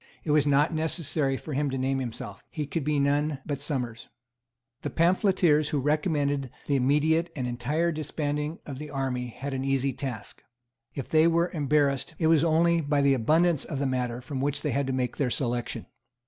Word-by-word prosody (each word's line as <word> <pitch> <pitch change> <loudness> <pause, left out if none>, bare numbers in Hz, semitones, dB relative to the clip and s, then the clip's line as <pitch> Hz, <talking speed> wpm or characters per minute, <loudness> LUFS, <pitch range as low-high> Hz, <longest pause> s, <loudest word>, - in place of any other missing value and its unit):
It 155 - -1
was 150 -1 +4
not 145 +3 +3
necessary 155 -3 -1
for 155 - -7
him 145 +1 0
to 135 - -2
name 135 +1 0
himself. 120 -4 -6
He 150 -2 -4
could 155 +2 -3
be 150 0 +1
none 145 +1 +1
but 140 -2 -3
Somers. 125 -6 -3 0.7
The - - -3
pamphleteers 170 -3 +3
who 150 - 0
recommended 145 -2 0 0.2
the 145 - +1
immediate 150 +5 +2
and 130 -4 -2
entire 135 +8 0
disbanding 150 0 -3
of 135 -3 -7
the 150 0 -7
army 130 -3 -2
had 135 +4 -6
an 130 0 -2
easy 135 0 0
task. 125 -6 -6 0.5
If 135 - -4
they 160 +1 +4
were 170 +1 +2
embarrassed, 145 -1 +1
it 160 - 0
was 160 -1 +5
only 170 +1 +3
by 145 -1 +1
the 140 -1 +4
abundance 155 +6 +3
of 145 - -5
the 140 - -1
matter 125 -2 -1
from 130 +1 -4
which 145 +1 -1
they - - 0
had 140 -1 0
to - - -1
make 125 -2 -1
their 135 -3 +1
selection. 120 -1 -2
145 Hz, 190 wpm, -27 LUFS, 135-155 Hz, 0.7 s, was